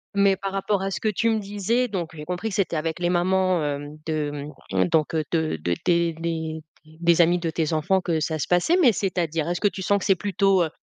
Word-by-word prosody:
Mais 200 -1 +4
par 195 -1 -4
rapport 195 0 -1
à 195 - -1
ce - - -3
que 215 - 0
tu 230 +3 +1
me 220 - +1
disais, 205 +5 0
donc 175 -5 -3
j'ai 150 - -7
compris 180 +5 -3
que 195 - -5
c'était 190 -4 0
avec 160 +2 -2
les 175 0 0
mamans, 185 0 +2
hem 145 +1 -4
de, 150 -2 -3 0.2
mmh, 95 -1 +2
donc, 160 0 +1
heu, 155 - +1
de 160 - 0
de 85 +1 0
des 170 -1 +2
les 160 -1 -3 0.3
des 170 +2 +2
amis 175 +1 +3
de 165 -1 -2
tes 160 0 -1
enfants 185 +5 +1
que 165 -2 0
ça 155 0 -1
se - - -3
passait, 180 - +3
mais, 260 -9 +6
c'est-à-dire, 170 -4 -1
est-ce 175 - -1
que 205 - +4
tu 190 0 -4
sens 200 +2 +2
que - - -4
c'est 195 - +4
plutôt, 195 -1 +2
heu, 160 - -2
175 Hz, 250 wpm, -24 LUFS, 160-195 Hz, 0.3 s, mais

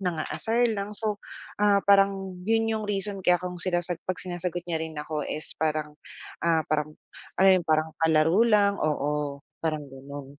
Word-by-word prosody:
nang-aasar 195 +7 0
lang 200 0 -4
so, 215 -1 -1 0.4
ah, 205 -1 +4
parang 195 -2 +3
yun 225 0 +2
yung 220 -1 -2
reason 200 -1 -2
kaya 180 -1 +4
kung 180 0 -5
sinasagot 175 -1 -2
pag 185 - -2
sinasagot 175 -1 -4
niya 165 -2 -1
rin 160 - -7
ako 150 0 -3
is 155 - -4
parang, 155 -1 -1 0.5
ah, 165 -1 +3
parang 155 0 0 0.5
ano 195 - +7
yung, 185 -2 +2
parang 155 0 +2
palaro 160 +4 +3
lang, 205 -3 +4
oo, 150 -1 -1 0.2
parang 155 -2 -1
gano'n. 140 +1 -9
175 Hz, 160 wpm, -27 LUFS, 155-200 Hz, 0.5 s, ano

